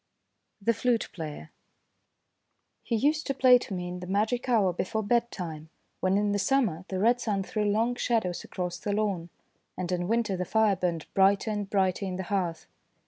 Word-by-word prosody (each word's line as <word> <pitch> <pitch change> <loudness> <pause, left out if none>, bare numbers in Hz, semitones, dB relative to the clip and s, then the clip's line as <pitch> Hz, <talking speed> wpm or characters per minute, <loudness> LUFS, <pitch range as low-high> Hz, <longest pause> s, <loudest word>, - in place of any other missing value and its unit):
THE 230 +3 +2
FLUTE 235 +1 0
PLAYER 150 - -7 1.3
HE 230 - -2
used 300 +7 +1
to 275 - -1
play 255 -1 +6
to 205 - -6
me 180 -1 -4
in 180 0 -5
the 180 - -7
magic 220 +6 0
hour 205 -7 +3
before 220 +5 -2
bedtime, 185 -9 -2 0.3
when, 185 +1 +2
in 205 0 +1
the 205 - 0
summer, 195 -6 +1
the 190 - -3
red 235 +5 +3
sun 200 -4 -1
threw 210 +2 -2
long 220 +4 +2
shadows 225 -7 -1
across 180 -1 -4
the 205 - -2
lawn, 200 -5 -1 0.5
and 185 -1 -3
in 175 -1 -1
winter 225 -2 +1
the 180 - -2
fire 215 +1 +3
burned 175 -4 -2
brighter 195 +3 +3
and 205 -2 -3
brighter 195 -1 +1
in 185 - -3
the 190 - -3
hearth. 175 -4 -1
200 Hz, 185 wpm, -28 LUFS, 180-230 Hz, 1.3 s, play